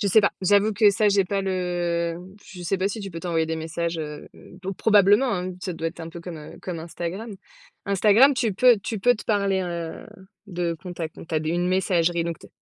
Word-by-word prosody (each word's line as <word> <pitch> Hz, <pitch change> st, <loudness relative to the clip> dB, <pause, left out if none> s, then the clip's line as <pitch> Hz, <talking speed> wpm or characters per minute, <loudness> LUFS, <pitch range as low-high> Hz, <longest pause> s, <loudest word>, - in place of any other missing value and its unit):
Je 205 Hz, -, 0 dB
sais 215 Hz, +3 st, +6 dB
pas. 200 Hz, -, +2 dB
J'avoue 205 Hz, +3 st, +3 dB
que 210 Hz, 0 st, +5 dB
ça, 210 Hz, +1 st, +2 dB
j'ai 200 Hz, -1 st, +3 dB
pas 195 Hz, +1 st, -1 dB
le 175 Hz, -3 st, -1 dB, 0.3 s
je 180 Hz, -2 st, -10 dB
sais 185 Hz, +2 st, -1 dB
pas 190 Hz, -, +1 dB
si 210 Hz, +2 st, -5 dB
tu 200 Hz, -1 st, -6 dB
peux 165 Hz, -1 st, -7 dB
t'envoyer 165 Hz, -3 st, 0 dB
des 160 Hz, 0 st, -2 dB
messages, 165 Hz, +1 st, -3 dB
heu 150 Hz, -1 st, -6 dB, 0.4 s
oh 195 Hz, -, -2 dB
probablement, 205 Hz, +4 st, +4 dB
hein, 180 Hz, 0 st, -3 dB
ça 185 Hz, -, -3 dB
doit 165 Hz, -1 st, -2 dB
être 170 Hz, +1 st, -12 dB
un 165 Hz, -, -6 dB
peu 170 Hz, +1 st, -9 dB
comme, 170 Hz, -1 st, -7 dB
heu, 150 Hz, -, -11 dB
comme 175 Hz, -3 st, -5 dB
Instagram. 175 Hz, +6 st, -6 dB, 0.5 s
Instagram, 210 Hz, +7 st, +5 dB
tu 225 Hz, -5 st, 0 dB
peux 245 Hz, +1 st, +5 dB
tu 215 Hz, +2 st, -4 dB
peux 245 Hz, +5 st, +4 dB
te 210 Hz, -, -10 dB
parler, 200 Hz, -3 st, +1 dB
heu, 170 Hz, -2 st, -5 dB, 0.4 s
de 175 Hz, -3 st, -2 dB
contact. 170 Hz, -3 st, -6 dB
Donc -, -, -11 dB
tu 160 Hz, -, -4 dB
as 155 Hz, -, +2 dB
d 155 Hz, -, -2 dB
une 175 Hz, +1 st, 0 dB
messagerie 175 Hz, -3 st, +1 dB
donc 170 Hz, -1 st, -4 dB
t -, -, -16 dB
180 Hz, 230 wpm, -24 LUFS, 170-200 Hz, 0.5 s, sais